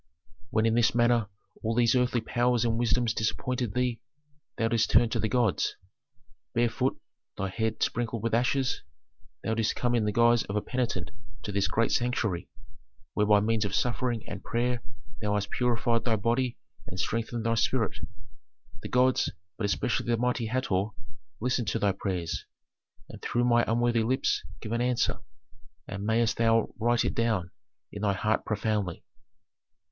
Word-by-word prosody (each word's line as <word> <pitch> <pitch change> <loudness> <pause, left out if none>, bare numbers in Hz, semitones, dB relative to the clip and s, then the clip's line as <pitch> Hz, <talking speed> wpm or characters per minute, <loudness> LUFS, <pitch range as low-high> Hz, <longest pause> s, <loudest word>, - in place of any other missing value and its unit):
"When 110 -3 +2
in 115 - +3
this 120 0 +3
manner 120 -2 +3 0.3
all 115 +1 -1
these 115 -1 +4
earthly 125 -1 +2
powers 120 +1 +1
and 115 -1 +1
wisdoms 120 -1 +2
disappointed 120 +1 -1
thee, 125 -2 0 0.6
thou 115 - +2
didst 115 -2 +2
turn 115 +1 +5
to - - -1
the 110 - 0
gods. 115 -8 +1 0.8
Barefoot, 120 +2 +1 0.4
thy 95 - -2
head 110 +2 -1
sprinkled 115 -2 -1
with 115 - -1
ashes, 130 +2 +1 0.6
thou 110 - 0
didst 110 -1 0
come 120 -1 0
in 115 -3 +2
the 105 - +1
guise 120 +2 +4
of 100 - -5
a 105 - +1
penitent 125 -2 -2 0.3
to 105 - -4
this 100 0 +1
great 115 +1 +1
sanctuary, 110 -7 0 0.6
where 105 0 +2
by 105 -1 +6
means 110 +1 +1
of 100 - -2
suffering 120 -2 -1
and 100 -1 -7
prayer 120 0 0 0.4
thou 105 -1 0
hast 100 0 -2
purified 120 -1 +1
thy 115 -3 +2
body 120 +4 0 0.3
and 95 - -7
strengthened 115 +2 -2
thy 115 - +2
spirit. 115 -1 +1 0.8
The - - -6
gods 125 +1 +3 0.3
but 105 - -2
especially 100 +4 0
the 120 -1 +2
mighty 120 -1 0
Hator 110 -6 0 0.5
listened 125 -1 0
to - - 0
thy 100 - +2
prayers, 90 -5 -3 0.6
and - - -11
through 120 - 0
my 120 -1 +4
unworthy 120 +1 +2
lips 130 +4 +1 0.2
give 110 - -6
an 115 +1 0
answer, 125 -1 +1 0.7
and 100 -1 -5
mayst 110 -1 +2
thou 115 -1 +2
write 120 +1 +2
it - - 0
down 110 -7 0 0.4
in 100 - -7
thy 100 -2 +2
heart 110 +3 0
profoundly." 105 -4 -1
115 Hz, 165 wpm, -28 LUFS, 105-120 Hz, 0.8 s, by